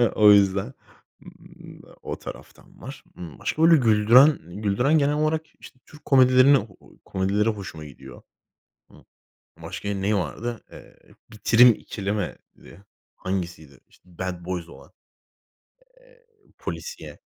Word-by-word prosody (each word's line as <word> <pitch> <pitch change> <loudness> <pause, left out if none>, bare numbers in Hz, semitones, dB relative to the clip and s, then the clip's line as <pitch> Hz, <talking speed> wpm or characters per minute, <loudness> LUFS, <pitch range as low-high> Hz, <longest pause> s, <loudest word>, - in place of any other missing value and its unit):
O 105 -1 +6
yüzden, 100 +4 +2 0.5
ımm, - - -15 0.2
o - - -7
taraftan - - -13
var. - - -10
Imm, 85 -4 -10
başka 155 - -3
böyle 165 0 +7
güldüren 120 +4 +5 0.2
güldüren 125 +10 +2
genel 145 0 +1
olarak, 155 +1 -1
işte, 130 - -15
Türk 150 - -18
komedilerini 130 -2 +4 0.4
komedileri 100 +3 0
hoşuma 90 -7 -7
gidiyor. 65 -2 -13 0.7
Hı. - - -19 0.6
Başka 100 - -6
neyi 100 +2 -1
vardı? 110 +7 -4
Eee, - - -15 0.3
"Bitirim 115 +3 +5
İkili" 100 -1 -6
mi, 105 -3 -3 0.3
diye? 95 +4 -16 0.3
Hangisiydi? 85 -7 -6
İşte, 90 -2 -24
Bad 90 -2 -5
Boys 90 -2 -5
olan. - - -16 1.1
Eee, - - -25 0.3
polisiye. 480 0 -8
105 Hz, 120 wpm, -23 LUFS, 95-130 Hz, 1.1 s, böyle